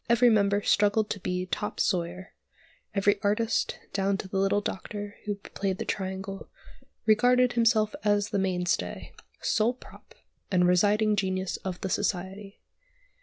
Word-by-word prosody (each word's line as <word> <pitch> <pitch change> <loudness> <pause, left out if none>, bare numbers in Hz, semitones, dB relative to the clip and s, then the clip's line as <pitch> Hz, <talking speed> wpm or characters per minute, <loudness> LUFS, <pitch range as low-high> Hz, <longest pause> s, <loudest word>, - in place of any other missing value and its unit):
Every 235 +1 +5
member 205 -1 +2
struggled 210 +1 +2
to 205 - -3
be 180 0 -2
"top 210 +3 -4
sawyer;" 180 +1 -1 0.6
every 200 +1 +2
artist, 220 +2 0 0.2
down 195 0 +1
to 195 - -6
the 190 0 -2
little 195 +1 +2
doctor 205 +1 -5
who 205 -1 -1
played 195 -1 -4
the - - -4
triangle 190 0 -4 0.6
regarded 245 +3 +4
himself 225 -2 +3
as 205 0 +2
the 200 - 0
mainstay, 180 0 -1 0.3
sole 225 +3 +1
prop, - - -16 0.3
and 180 -2 +3
presiding 205 +4 +3
genius 190 -1 -1
of 185 -2 -6
the 190 - -2
society. 195 0 -3
200 Hz, 140 wpm, -28 LUFS, 190-210 Hz, 0.6 s, Every